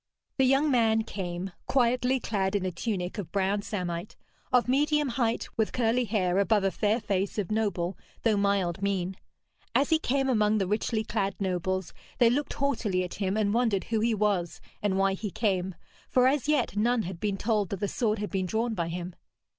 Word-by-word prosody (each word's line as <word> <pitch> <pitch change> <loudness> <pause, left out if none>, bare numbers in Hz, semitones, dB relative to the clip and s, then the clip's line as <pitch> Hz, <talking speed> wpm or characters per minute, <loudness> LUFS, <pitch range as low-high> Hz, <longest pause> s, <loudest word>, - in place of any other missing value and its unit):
The 265 - +4
young 275 +3 +3
man 225 -3 +3
came, 185 -3 -5 0.2
quietly 250 0 +2
clad 195 -4 -1
in 195 -2 0
a 185 - -1
tunic 185 +1 -3
of 190 - -6
brown 200 +1 +1
samite, 180 -3 -4 0.4
of 250 -1 +4
medium 295 +2 +2
height, 235 -2 0
with 220 -1 +1
curly 245 0 +1
hair 190 -4 +1
above 205 0 +3
a 195 - +2
fair 215 +4 +1
face 195 -2 -1
of 205 -1 -2
noble, 195 -5 0 0.3
though 225 -2 +3
mild 200 -3 +1
mien. 190 -2 -1 0.6
As 280 - +3
he 320 - +5
came 270 -1 0
among 215 -4 +3
the 195 - +1
richly 215 +3 0
clad 195 -2 -1
nobles, 185 -1 -2 0.2
they 235 -1 +5
looked 285 +4 -1
haughtily 225 -10 0
at 180 - -5
him, 195 +1 0
and 210 -1 +1
wondered 225 -5 +2
who 225 -1 -1
he 225 +1 +2
was 200 -5 0 0.2
and 200 -2 +1
why 195 0 +3
he 205 +2 -4
came, 190 -3 -1 0.3
for 250 -1 +4
as 280 +1 +1
yet 295 -8 +1
none 230 +2 +2
had 175 -1 -6
been 200 -1 -1
told 210 -3 0
that 200 - -4
the 205 - 0
sword 220 0 0
had 210 0 -4
been 190 -2 -1
drawn 225 +4 0
by 170 -5 -2
him. 175 +1 -5
210 Hz, 195 wpm, -28 LUFS, 190-235 Hz, 0.6 s, he